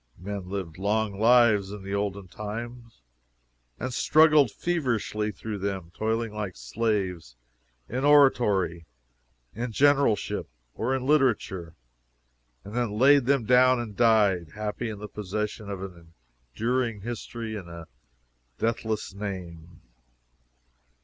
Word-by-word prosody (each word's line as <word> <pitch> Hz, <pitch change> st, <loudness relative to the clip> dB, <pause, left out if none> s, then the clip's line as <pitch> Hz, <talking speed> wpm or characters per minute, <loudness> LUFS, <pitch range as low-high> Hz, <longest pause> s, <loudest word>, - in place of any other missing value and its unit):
Men 95 Hz, 0 st, -6 dB
lived 95 Hz, -4 st, -5 dB
long 105 Hz, 0 st, 0 dB
lives, 110 Hz, -4 st, +4 dB
in 105 Hz, -1 st, -8 dB
the 100 Hz, +1 st, -5 dB
olden 100 Hz, -1 st, -2 dB
time, 115 Hz, +5 st, -7 dB, 0.9 s
and 125 Hz, +1 st, -3 dB
struggled 155 Hz, -1 st, +5 dB
feverishly 120 Hz, -10 st, -1 dB
through 105 Hz, +1 st, -6 dB
them, 95 Hz, -3 st, -4 dB
toiling 110 Hz, 0 st, -1 dB
like 105 Hz, -4 st, -4 dB
slaves, 90 Hz, -, -2 dB, 0.5 s
in 130 Hz, +4 st, -3 dB
oratory, 105 Hz, -, +3 dB, 0.7 s
in 120 Hz, +2 st, -4 dB
generalship, 140 Hz, -3 st, +2 dB, 0.3 s
or 130 Hz, +4 st, -1 dB
in 130 Hz, -1 st, -3 dB
literature, 110 Hz, -, +1 dB, 0.9 s
and 105 Hz, -, -10 dB
then 120 Hz, -3 st, -1 dB
laid 135 Hz, +1 st, +5 dB
them 135 Hz, -4 st, +2 dB
down 125 Hz, +1 st, +5 dB
and 110 Hz, -4 st, -6 dB
died, 100 Hz, -8 st, +3 dB
happy 105 Hz, +2 st, -3 dB
in 105 Hz, -, -6 dB
the 105 Hz, +1 st, -7 dB
possession 105 Hz, +1 st, -4 dB
of 95 Hz, -1 st, -5 dB
an 85 Hz, -3 st, -11 dB, 0.4 s
enduring 115 Hz, -2 st, -1 dB
history 115 Hz, 0 st, -5 dB
and 95 Hz, -5 st, -7 dB
a 85 Hz, -1 st, -9 dB, 0.7 s
deathless 110 Hz, -3 st, -2 dB
name. 90 Hz, -4 st, -7 dB
105 Hz, 120 wpm, -26 LUFS, 95-120 Hz, 0.9 s, struggled